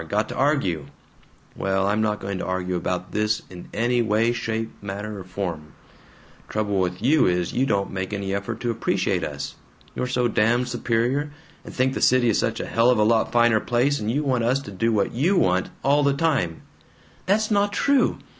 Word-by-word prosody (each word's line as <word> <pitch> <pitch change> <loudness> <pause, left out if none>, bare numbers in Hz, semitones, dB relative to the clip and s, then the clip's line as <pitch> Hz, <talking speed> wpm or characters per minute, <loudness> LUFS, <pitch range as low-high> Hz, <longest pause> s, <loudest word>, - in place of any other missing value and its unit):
Got 105 +3 0
to - - -5
argue. 115 - 0 0.7
Well, 95 0 0
I'm 105 +2 +1
not 105 -1 0
going 95 -1 -4
to - - -4
argue 95 0 -2
about 90 +1 -3
this 105 0 0
in 90 -1 -10
any 120 +2 +1
way, 110 +1 +2
shape, 115 -1 -3
manner, 100 +1 -5
or - - -7
form. 90 -5 -5 0.8
Trouble 105 -2 -1
with 90 +2 -2
you 145 +4 +4
is, 90 -1 0
you 130 +2 +1
don't 100 -3 0
make 95 0 -4
any 100 -1 -3
effort 100 0 -3
to 120 - 0
appreciate 115 - 0
us. - - -5 0.4
You're 125 - -2
so 125 -1 +1
damned 120 +3 +1
superior, 120 +4 0 0.3
and - - -9
think 130 +1 +1
the - - -4
city 125 -1 +4
is 110 - +2
such - - -1
a - - -3
hell 115 +2 +2
of 125 - +4
a 105 - +4
lot 110 +1 +2
finer 120 -2 +4
place, 130 +6 +1
and 105 - -3
you 145 +6 0
want 130 -4 +1
us 125 +4 +2
to 100 - -9
do 115 +4 0
what 105 -3 +1
YOU 165 +11 +1
want, 90 - +2
all 140 +3 +3
the 140 -1 +3
time 140 - 0 0.3
" - - -30
"That's 215 +3 +2
not 205 0 +2
true! 280 +6 +2
110 Hz, 205 wpm, -23 LUFS, 100-125 Hz, 0.8 s, you